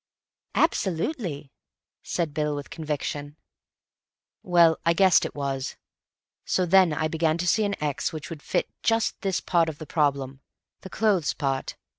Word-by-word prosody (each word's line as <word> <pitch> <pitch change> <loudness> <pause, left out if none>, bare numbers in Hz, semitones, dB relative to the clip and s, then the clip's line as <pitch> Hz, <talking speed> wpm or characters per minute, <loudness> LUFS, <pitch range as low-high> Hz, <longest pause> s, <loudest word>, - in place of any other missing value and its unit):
"Absolutely," 180 - -1 0.5
said 165 -4 -2
Bill 150 -1 -1
with 145 0 -7
conviction. 150 -1 -4 1.0
"Well, 170 -3 +4
I 170 - +3
guessed 185 +1 +5
it - - -6
was. 135 -2 -3 0.7
So 185 - +1
then 185 -1 +5
I 155 +1 0
began 160 0 +1
to 175 - -2
see 215 +4 +3
an 200 0 -1
x 150 +2 -1
which 155 0 -7
would 155 -3 -7
fit - - -1
just 225 -1 +1
this 195 -3 0
part 170 -2 +2
of 155 - -7
the 155 - -8
problem—the 140 +3 -3
clothes 200 -9 +1
part. 135 -2 -2
160 Hz, 145 wpm, -26 LUFS, 145-180 Hz, 1.0 s, guessed